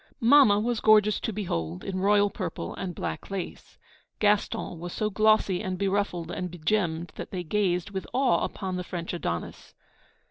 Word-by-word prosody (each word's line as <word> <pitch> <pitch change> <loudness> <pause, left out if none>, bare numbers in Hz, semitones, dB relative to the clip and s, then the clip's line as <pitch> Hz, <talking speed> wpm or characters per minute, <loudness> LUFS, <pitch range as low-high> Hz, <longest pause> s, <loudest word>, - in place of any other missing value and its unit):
Mamma 235 -4 +6
was 235 +1 0
gorgeous 215 -1 +5
to - - -3
behold, 90 - -3
in 190 -1 -3
royal 205 +1 +3
purple - - -5
and 180 -3 -5
black - - -5
lace. 195 -2 -6 0.4
Gaston 205 -4 0
was 175 +1 -6
so 215 0 -1
glossy 215 -2 +3
and 185 -1 -3
beruffled 195 -3 -1
and 180 -1 -3
begemmed, 170 -1 -1
that - - -6
they 180 -2 -4
gazed 180 +1 0
with 190 -1 -5
awe 260 -1 +2
upon 190 -3 -3
the 180 - -3
French 175 -1 -5
Adonis. 85 - -5
195 Hz, 165 wpm, -27 LUFS, 175-210 Hz, 0.4 s, Mamma